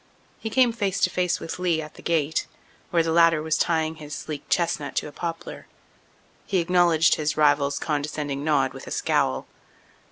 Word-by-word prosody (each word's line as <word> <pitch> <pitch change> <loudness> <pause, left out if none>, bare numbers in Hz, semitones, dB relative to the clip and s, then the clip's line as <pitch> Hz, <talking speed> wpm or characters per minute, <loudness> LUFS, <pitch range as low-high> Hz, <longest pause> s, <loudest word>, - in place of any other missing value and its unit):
He 220 - -4
came 250 +1 +4
face 200 -4 -1
to 185 - +3
face 180 -2 0
with 165 - -6
Lee 175 -3 +1
at 155 -1 -7
the - - -14
gate, 160 -2 0 0.4
where 170 -1 +2
the 165 - -1
latter 165 -1 +5
was 160 0 +1
tying 160 -1 0
his 150 -1 -7
sleek 150 -2 -7
chestnut 170 -4 0
to - - -1
a - - -9
poplar. 165 +2 -6 0.8
He 195 - 0
acknowledged 170 -2 +4
his 150 0 -1
rival's 145 -2 +3
condescending 145 -2 -3
nod 145 -4 +2
with - - -10
a - - -8
scowl. 65 0 0
160 Hz, 180 wpm, -25 LUFS, 150-175 Hz, 0.8 s, latter